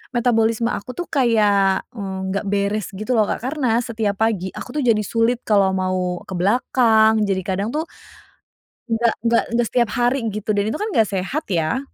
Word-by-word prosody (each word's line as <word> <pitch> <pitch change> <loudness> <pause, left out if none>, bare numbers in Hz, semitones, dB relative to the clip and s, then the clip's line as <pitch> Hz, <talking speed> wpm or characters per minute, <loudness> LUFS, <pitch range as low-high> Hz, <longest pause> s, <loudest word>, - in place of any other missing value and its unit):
metabolisme 230 -1 +2
aku - - -11
tuh 350 +4 -5
kayak 210 -6 +3
nggak 190 0 -4
beres 200 0 0
gitu 215 +6 -4
loh 215 - +5
Kak - - -2
karena 285 -2 -1 0.2
setiap 220 -3 -1
pagi 215 -5 +1
aku - - -8
tuh 280 - 0
jadi 220 -3 +3
sulit 230 +3 +1
kalau 200 -2 +4
mau 185 -1 -1
ke - - -5
belakang 220 +2 +3
jadi 190 -1 0
kadang 195 +2 -1
tuh. 315 - 0 1.1
Nggak 230 +1 +2
nggak 230 0 +3
nggak 240 -1 +2
setiap 240 -3 +1
hari 245 +2 +2
gitu 215 0 -5
dan 205 -1 +1
itu 220 - -2
kan 425 - -2
nggak 225 - +3
sehat 200 +11 -2
ya, 175 +6 0
220 Hz, 175 wpm, -21 LUFS, 195-235 Hz, 1.1 s, loh